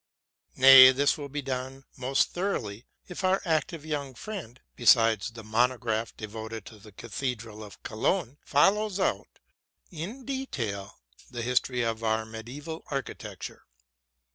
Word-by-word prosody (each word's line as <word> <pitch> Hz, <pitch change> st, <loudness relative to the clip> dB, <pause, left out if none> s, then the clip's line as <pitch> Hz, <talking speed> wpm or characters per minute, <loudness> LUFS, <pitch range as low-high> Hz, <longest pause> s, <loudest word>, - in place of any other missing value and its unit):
Nay, 130 Hz, 0 st, +10 dB
this 140 Hz, +2 st, +2 dB
will 145 Hz, -2 st, -7 dB
be 145 Hz, +1 st, -4 dB
done 130 Hz, +1 st, -5 dB
most 135 Hz, +1 st, +1 dB
thoroughly 125 Hz, -, -3 dB, 0.2 s
if 180 Hz, +1 st, -7 dB
our 185 Hz, +1 st, +3 dB
active 160 Hz, -1 st, -1 dB
young 140 Hz, -4 st, -4 dB
friend, 165 Hz, -, -7 dB, 0.2 s
besides 115 Hz, -2 st, +4 dB
the 115 Hz, -1 st, -11 dB
monograph 115 Hz, 0 st, 0 dB
devoted 110 Hz, 0 st, -7 dB
to 110 Hz, -, -12 dB
the 105 Hz, +1 st, -15 dB
cathedral 115 Hz, 0 st, -5 dB
of 105 Hz, -2 st, -13 dB
Cologne, 140 Hz, -, -1 dB
follows 200 Hz, +7 st, +2 dB
out -, -, -1 dB, 0.5 s
in 195 Hz, -, -7 dB
detail 120 Hz, -, -4 dB, 0.3 s
the 120 Hz, -1 st, -5 dB
history 125 Hz, 0 st, +1 dB
of 115 Hz, 0 st, -2 dB
our 110 Hz, 0 st, +1 dB
medieval 130 Hz, +9 st, -8 dB
architect 140 Hz, -2 st, -5 dB
ure. -, -, -18 dB
130 Hz, 135 wpm, -28 LUFS, 110-150 Hz, 0.5 s, Nay